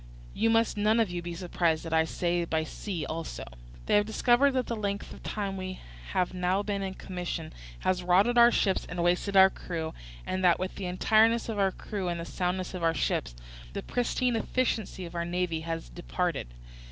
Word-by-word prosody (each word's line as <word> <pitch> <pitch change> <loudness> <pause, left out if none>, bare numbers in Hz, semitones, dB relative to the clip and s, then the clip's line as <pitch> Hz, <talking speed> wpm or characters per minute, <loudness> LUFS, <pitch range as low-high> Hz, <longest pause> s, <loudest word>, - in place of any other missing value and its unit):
You 225 - +2
must 225 -1 +2
none 215 +2 +3
of 220 -5 +2
you 175 0 -3
be 170 0 -5
surprised 170 -2 0
that 165 - -4
I 160 0 +4
say 175 +1 0
by 160 -1 0
sea 165 0 -4
also. 160 +2 -5 0.4
They - - 0
have 205 - +3
discovered 245 +5 +3
that 255 -2 +1
the 235 - -3
length 200 -2 -3
of - - -12
the - - -5
time 200 -2 -3
we 185 0 -5 0.3
have 180 - +1
now 185 +2 +1
been 200 -1 -2
in 190 -1 -4
commission 175 -4 -5 0.3
has 185 -1 +1
rotted 185 +7 +4
our 240 0 +8
ships 195 -5 +1
and 175 -1 -2
wasted 180 +3 +2
our 190 0 +8
crews, 160 -2 -5 0.3
and 185 0 -2
that 175 -2 +5
with 185 +1 -3
the 190 - -5
entireness 220 +5 +3
of 215 -2 -2
our 195 -1 +3
crews 190 -1 -4
and 170 -1 -2
the 170 - -4
soundness 185 +1 -2
of 180 - -5
our 165 0 +2
ships - - -1 0.4
the - - -4
pristine 245 0 0
efficiency 225 -5 -1
of 170 - -9
our 170 -1 -1
navy 175 -1 -1
has 165 0 -4
departed. 175 - -2
185 Hz, 205 wpm, -29 LUFS, 175-210 Hz, 0.4 s, our